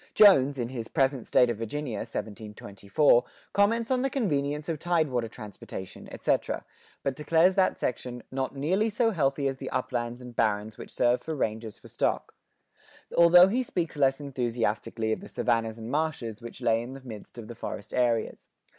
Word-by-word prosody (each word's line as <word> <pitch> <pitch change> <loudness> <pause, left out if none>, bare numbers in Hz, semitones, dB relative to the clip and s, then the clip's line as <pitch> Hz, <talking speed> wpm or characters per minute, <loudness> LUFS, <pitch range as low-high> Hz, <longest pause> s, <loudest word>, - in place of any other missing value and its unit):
Jones, 145 -10 +7
in 120 -2 -2
his 120 -3 -5
"Present 135 -2 0
State 125 -1 +4
of 115 - -4
Virginia" 115 0 -4
(1724), 105 +3 0 0.3
comments 225 +4 +2
on 255 -1 +2
the 270 - +1
convenience 150 - -1
of 165 -3 -2
tidewater 155 -9 +1
transportation, 105 -3 -9
etc., - - -1 0.4
but 135 -1 -1
declares 165 +5 +3
that 190 0 +2
section 125 -1 -3
"not 130 +1 -2
nearly 185 +11 +1
so 225 +1 +2
healthy 140 -5 +1
as 135 -1 -2
the - - -6
uplands 120 -1 -2
and 125 -1 -10
Barrens 110 -1 0
which - - -8
serve 120 0 +2
for 160 - -4
Ranges 110 -4 -3
for - - -15
Stock," - - -1 0.8
although 175 +2 +8
he 235 +6 +1
speaks 175 -10 -3
less 135 -1 +2
enthusiastically 115 -4 -2
of - - 0
the - - -9
savannas 115 -2 0
and 115 +1 -7
marshes 140 -7 -2
which 120 0 -9
lay 115 0 +3
in 120 +3 -7
the 135 - -9
midst 110 -2 -10
of 115 -2 -8
the 120 - -7
forest 110 -2 -7
areas. 120 -3 0
130 Hz, 175 wpm, -28 LUFS, 115-155 Hz, 0.8 s, although